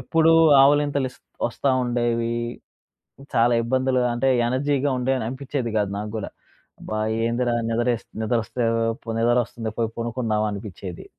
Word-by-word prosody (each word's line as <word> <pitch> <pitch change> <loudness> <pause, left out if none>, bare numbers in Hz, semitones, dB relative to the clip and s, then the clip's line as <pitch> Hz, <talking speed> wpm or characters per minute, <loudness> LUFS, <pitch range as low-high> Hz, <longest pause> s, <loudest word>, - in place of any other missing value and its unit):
ఎప్పుడూ 165 0 +3 0.3
ఆవులింతలిస్ 140 -2 +2 0.3
ఒస్తా 130 +3 -1
ఉండేవి. 120 -1 0 1.0
చాలా 120 +1 +4
ఇబ్బందులు 130 +2 +1
అంటే 120 +3 0 0.2
ఎనర్జీగా 140 +2 0
ఉండేను 130 -2 0
అనిపిచ్చేది 130 -2 -3
కాదు 100 -1 0
నాగ్గుడా. 105 0 -5 0.5
అబ్బా! 110 0 -4 0.3
ఏందిరా 120 +1 0 0.2
నిద్రేస్ 120 0 0 0.2
నిద్ర 115 +2 +1
ఒస్తే 120 +2 -3 0.4
పోనీ 115 0 -4
నిద్రొస్తుంది 120 -1 0
పోయి 115 -1 0
పనుకుందాం 115 -2 -1
అనిపిచ్చేది. 100 -3 -7
120 Hz, 120 wpm, -23 LUFS, 115-130 Hz, 1.0 s, చాలా